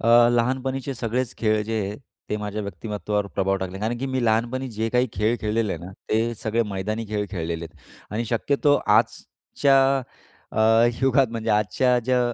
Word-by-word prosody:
अ, 120 +1 +6
लहानपणीचे 130 +3 -1
सगळेच 120 +1 -2
खेळ 110 -1 +2
जे 110 0 -1
आहेत 100 +1 -4 0.3
ते 105 - 0
माझ्या 105 0 -4
व्यक्तिमत्त्वावर 105 0 -3
प्रभाव 95 0 +1
टाकले. 95 0 -5
कारण 115 +3 -1
की 135 - -2
मी 130 -2 -1
लहानपणी 120 +4 0
जे 110 0 -2
काही 125 +1 +3
खेळ 110 +3 +1
खेळलेले 110 -1 0
आहे - - -6
ना 90 - -8 0.2
ते 115 +2 +1
सगळे 110 +1 0
मैदानी 110 +4 -3
खेळ 105 -1 -1
खेळलेले 85 -3 -3
आहेत. 80 - -14 0.3
आणि 115 +3 -1
शक्यतो 140 +5 +2 0.2
आजच्या 140 -1 +1 0.7
अ, - - -5 0.4
युगात 135 0 +4
म्हणजे 115 -1 -2
आजच्या 105 +4 +2
ज्या 125 0 +2
115 Hz, 170 wpm, -24 LUFS, 105-125 Hz, 0.7 s, अ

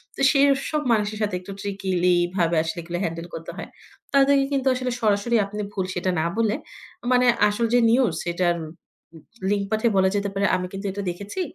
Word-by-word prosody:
তো - - -6
সেই 280 -1 +4 0.3
সব 305 - 0
মানুষের 215 -1 0
সাথে 205 -3 0
একটু 185 +2 -10
ট্রিকিলি 190 -3 0 0.2
ভাবে 170 -2 +1
আসলে 165 +2 -4
এগুলো 175 +1 -4
হ্যান্ডেল 165 0 -4
করতে 165 0 -6
হয়। - - -6 0.5
তাদেরকে 275 0 +4
কিন্তু 270 -1 0
আসলে 255 0 -2
সরাসরি 215 +2 +1
আপনি 210 +1 -5
ভুল 190 -2 -2
সেটা 180 +1 0
না 155 - 0
বলে 225 -2 +2 0.6
মানে 250 0 +4 0.2
আসল 210 +3 0
যে 245 - +6
নিউজ 235 -6 +3
সেটার 175 0 0 1.0
লিঙ্ক 205 -1 +1
পাঠিয়ে 220 +1 +2
বলা 190 0 +4
যেতে 200 0 0
পারে। 195 +1 0
আমি 185 0 -2
কিন্তু 195 +1 -6
এটা 200 +2 -5
দেখেছি। 200 - -6
200 Hz, 185 wpm, -23 LUFS, 180-230 Hz, 1.0 s, যে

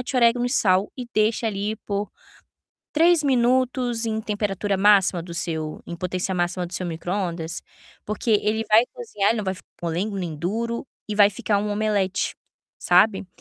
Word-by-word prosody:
orégano 240 0 +4
e - - -1
sal 195 -6 +2
e 245 -2 -6
deixe 215 +2 +1
ali 210 0 -2
por 200 0 -4 0.8
3 330 +1 +4
minutos 250 -2 +1
em 220 -1 -1
temperatura 205 -2 -1
máxima 195 -3 +4
do 170 0 -9
seu 160 -2 -3
em - - -5
potência 185 +2 -2
máxima 175 0 -1
do 175 - -13
seu 180 0 -2
micro-ondas, 170 -1 -3 0.5
porque 215 +3 -2
ele 220 +2 0
vai 220 +2 +6
cozinhar, 445 - 0
ele 230 - 0
não 210 - -2
vai 190 0 -1
ficar 185 - -16 0.2
molengo 175 +5 -2
nem 175 -4 -4
duro 230 - -3 0.2
e 210 - -2
vai 205 -1 +6
ficar 215 -2 0
um 210 +1 -2
omelete, 205 -3 0 0.4
sabe. 190 +2 +3
205 Hz, 165 wpm, -23 LUFS, 185-230 Hz, 0.8 s, vai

